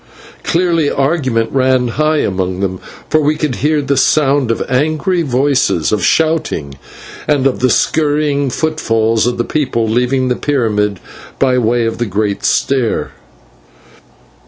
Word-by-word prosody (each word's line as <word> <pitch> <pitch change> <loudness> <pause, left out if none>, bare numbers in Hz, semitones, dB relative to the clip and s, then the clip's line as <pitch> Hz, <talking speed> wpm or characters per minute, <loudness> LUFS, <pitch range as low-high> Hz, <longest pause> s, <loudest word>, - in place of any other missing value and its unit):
Clearly 165 -3 +1
argument 135 -6 0
ran 130 -2 +2
high 155 +4 +1
among 95 -1 -2
them, 95 -2 -2 0.3
for 155 - +2
we 150 +1 +1
could 150 -5 -2
hear 150 +1 0
the 140 0 0
sound 140 -3 +2
of 115 - 0
angry 155 +7 0
voices, 130 - +1
of 105 -4 0
shouting, 155 - 0 0.5
and 145 -3 +1
of 135 - +1
the 130 - +2 0.2
hurrying 145 -2 0
footfalls 115 -7 0
of 125 - -1
the 120 - 0
people 120 -5 -1
leaving 125 +3 0
the 125 - 0
pyramid 105 -9 -1 0.4
by 130 -2 +2
way 120 0 +1
of 115 - -3
the 120 - -1
great 100 +1 -2
stair. 130 -5 0
130 Hz, 140 wpm, -15 LUFS, 115-150 Hz, 0.5 s, ran